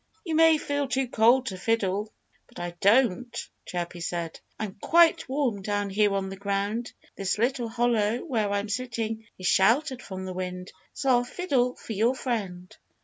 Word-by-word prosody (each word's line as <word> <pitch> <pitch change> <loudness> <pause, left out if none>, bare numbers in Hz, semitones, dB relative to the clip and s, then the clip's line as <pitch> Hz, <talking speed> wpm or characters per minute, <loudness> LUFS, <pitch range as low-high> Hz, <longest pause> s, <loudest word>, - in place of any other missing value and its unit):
"You 330 - -2
may 325 0 +6
feel 285 -1 -2
too 260 0 0
cold 240 +3 +4
to 190 -6 -5
fiddle; 210 -1 0 0.4
but - - -13
I 175 0 -3
don't!" 240 +2 +3 0.3
Chirpy 175 0 -4
said. 170 -1 -4 0.2
"I'm 210 -3 -5
quite 335 -4 +4
warm 260 -7 0
down 205 0 -2
here 205 0 +2
on 195 -1 -2
the 195 - -7
ground. 200 +4 -2 0.2
This 195 0 -1
little 240 +1 0
hollow 230 -2 +1
where 225 -9 0
I'm 200 +1 -1
sitting 225 -1 -3
is 185 - -8
sheltered 245 - +3
from 190 -3 -7
the 185 - -5
wind. 180 0 -5 0.2
So 270 - -1
I'll 245 -1 +4
fiddle 250 -3 0
for 225 - -7
your 230 +5 +2
friend." 195 -9 -4
220 Hz, 170 wpm, -27 LUFS, 195-250 Hz, 0.4 s, may